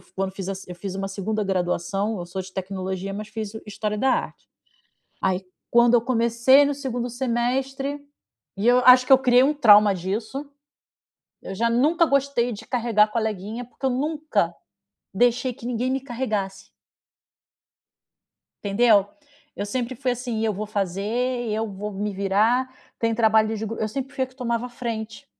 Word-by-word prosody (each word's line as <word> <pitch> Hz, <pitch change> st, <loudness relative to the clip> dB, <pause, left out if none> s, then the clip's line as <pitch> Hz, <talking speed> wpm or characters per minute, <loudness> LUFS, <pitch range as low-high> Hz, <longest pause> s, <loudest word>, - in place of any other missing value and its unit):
quando 190 Hz, 0 st, -2 dB
fiz 195 Hz, 0 st, -6 dB
a 195 Hz, -, -2 dB
se 190 Hz, -1 st, -11 dB
eu -, -, -5 dB
fiz 190 Hz, +1 st, -6 dB
uma 195 Hz, 0 st, -3 dB
segunda 210 Hz, +2 st, -2 dB
graduação 195 Hz, +2 st, -1 dB
eu 175 Hz, -, -5 dB
sou 190 Hz, +2 st, -5 dB
de 190 Hz, 0 st, -9 dB
tecnologia, 190 Hz, 0 st, -4 dB
mas 210 Hz, +1 st, -6 dB
fiz 215 Hz, -1 st, -5 dB
história 210 Hz, 0 st, -3 dB
da 265 Hz, -, +2 dB
arte, -, -, -3 dB, 0.7 s
aí 190 Hz, 0 st, 0 dB, 0.2 s
quando 235 Hz, 0 st, +5 dB
eu 235 Hz, -, +5 dB
comecei 240 Hz, +3 st, +4 dB
no 285 Hz, -, 0 dB
segundo 250 Hz, -3 st, -4 dB
semestre 265 Hz, +3 st, -2 dB, 0.5 s
e 210 Hz, +4 st, 0 dB
eu 250 Hz, +1 st, +6 dB
acho 255 Hz, 0 st, +8 dB
que 270 Hz, -, +6 dB
eu 265 Hz, -, +9 dB
criei 250 Hz, -1 st, +5 dB
um 295 Hz, +3 st, +3 dB
trauma 210 Hz, -7 st, +6 dB
disso, 215 Hz, +10 st, -4 dB, 1.0 s
eu 190 Hz, -, -6 dB
já 230 Hz, +4 st, +1 dB
nunca 305 Hz, +8 st, +3 dB
gostei 275 Hz, -4 st, +1 dB
de 205 Hz, -, -9 dB
carregar 230 Hz, -4 st, +2 dB
coleguinha 220 Hz, +1 st, -3 dB
porque 255 Hz, +2 st, -6 dB
eu -, -, +2 dB
nunca 270 Hz, -, -1 dB, 0.6 s
deixei 245 Hz, +4 st, +2 dB
que 235 Hz, -, -12 dB
ninguém 245 Hz, +1 st, -1 dB
me 270 Hz, -, 0 dB
carregasse. 215 Hz, -7 st, -4 dB, 1.9 s
Entendeu? 205 Hz, -1 st, +4 dB, 0.5 s
Eu 200 Hz, -, -3 dB
sempre 250 Hz, +3 st, -3 dB
fui 255 Hz, 0 st, -1 dB
assim, 240 Hz, -3 st, -3 dB
eu 220 Hz, -, +1 dB
vou 210 Hz, +2 st, -5 dB
fazer, 195 Hz, -2 st, -2 dB
e 240 Hz, 0 st, -1 dB
eu 220 Hz, +1 st, -1 dB
vou 205 Hz, +2 st, -6 dB
me 205 Hz, +1 st, -3 dB
virar, 220 Hz, +7 st, +1 dB, 0.3 s
tem 230 Hz, -1 st, 0 dB
trabalho 220 Hz, -1 st, +3 dB
de 220 Hz, -, -4 dB
gru 225 Hz, -, -5 dB
eu 220 Hz, -, 0 dB
sempre 270 Hz, +4 st, -5 dB
fui 260 Hz, -, 0 dB
a -, -, -9 dB
que 260 Hz, -, -22 dB
tomava 235 Hz, -1 st, -2 dB
a -, -, -9 dB
frente, 230 Hz, +1 st, -6 dB
225 Hz, 175 wpm, -24 LUFS, 200-250 Hz, 1.9 s, eu